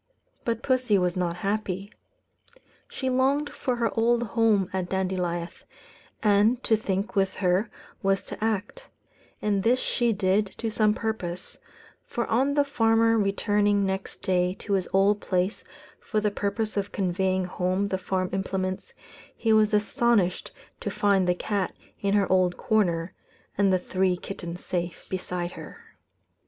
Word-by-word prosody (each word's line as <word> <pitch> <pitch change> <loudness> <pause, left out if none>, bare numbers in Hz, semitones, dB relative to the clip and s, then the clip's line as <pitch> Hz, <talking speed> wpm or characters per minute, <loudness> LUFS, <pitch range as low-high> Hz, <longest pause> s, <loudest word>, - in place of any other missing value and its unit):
But 230 +1 -2
pussy 255 -6 +2
was 180 -2 +1
not 175 -2 -1
happy. 200 -1 -2 1.0
She 260 - -4
longed 270 +3 +2
for 255 -3 -2
her 235 -1 0
old 235 +1 +3
home 220 -4 +2
at 185 -2 -2
Dandilieth; 180 -2 -2 0.6
and 215 +4 +3
to 225 - +4
think, 200 -1 -2
with 195 -1 +1
her, 185 +3 +1 0.3
was 195 -1 +1
to - - -7
act; 220 - -2 0.5
and 205 -2 +1
this 235 +5 +3
she 240 -2 +1
did 200 0 +2
to 225 -1 -2
some 215 -1 +2
purpose, 185 -6 -4 0.4
for 235 - -3
on 270 +5 +1
the 290 - +4
farmer 225 -4 +3
returning 205 0 +2
next 190 0 -4
day 180 0 +1
to 200 - -4
his 190 -2 +1
old 200 +2 +3
place 185 +2 -1 0.4
for 215 - -1
the 210 -1 0
purpose 210 +2 -2
of 200 0 -1
conveying 190 0 0
home 185 +2 -1
the 190 - -1
farm 185 0 -2
implements, 190 0 -3 0.4
he 225 -1 +2
was 215 -1 +4
astonished 210 -2 +1 0.3
to - - -3
find 195 -3 +2
the 180 - +3
cat 200 0 -2 0.2
in 200 0 +1
her 200 -2 +3
old 185 -1 +3
corner, 185 -7 +1 0.4
and 200 -1 +3
the 185 - +4
three 185 0 0
kittens 175 -2 -7
safe 175 -1 -3
beside 180 -1 -3
her. - - -10
200 Hz, 150 wpm, -26 LUFS, 185-220 Hz, 1.0 s, to